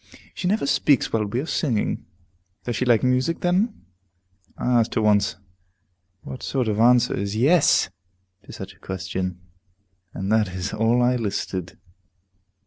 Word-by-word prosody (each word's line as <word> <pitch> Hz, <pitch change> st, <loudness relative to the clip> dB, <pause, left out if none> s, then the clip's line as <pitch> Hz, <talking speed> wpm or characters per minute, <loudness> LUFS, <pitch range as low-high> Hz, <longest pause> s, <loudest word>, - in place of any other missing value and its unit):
She 180 Hz, -, -3 dB
never 210 Hz, -3 st, +1 dB
speaks 140 Hz, -1 st, +2 dB
while 110 Hz, -2 st, +1 dB
we 120 Hz, +5 st, -2 dB
are -, -, -5 dB
singing. 130 Hz, -9 st, -1 dB, 0.6 s
Does 120 Hz, -, -3 dB
she 125 Hz, -, -1 dB
like 120 Hz, -3 st, +3 dB
music, 130 Hz, +6 st, +1 dB
then? 190 Hz, +6 st, 0 dB, 0.7 s
I 125 Hz, -1 st, +2 dB
asked 115 Hz, -, -1 dB
her 115 Hz, -, +2 dB
once, 105 Hz, -1 st, +3 dB, 0.9 s
but -, -, -10 dB
what 130 Hz, -, -8 dB
sort 130 Hz, -4 st, -1 dB
of 105 Hz, -1 st, -1 dB
answer 120 Hz, +1 st, +4 dB
is 100 Hz, +1 st, -3 dB
"Yes!" 145 Hz, -, +4 dB, 0.6 s
to -, -, -11 dB
such -, -, -8 dB
a -, -, -27 dB
question? 95 Hz, -1 st, -4 dB, 0.7 s
And 95 Hz, +2 st, -4 dB
that 105 Hz, -5 st, +1 dB
is 95 Hz, +1 st, -4 dB
all 115 Hz, +3 st, +2 dB
I 125 Hz, +1 st, +3 dB
elicited. 100 Hz, -6 st, -3 dB
115 Hz, 155 wpm, -23 LUFS, 100-130 Hz, 0.9 s, answer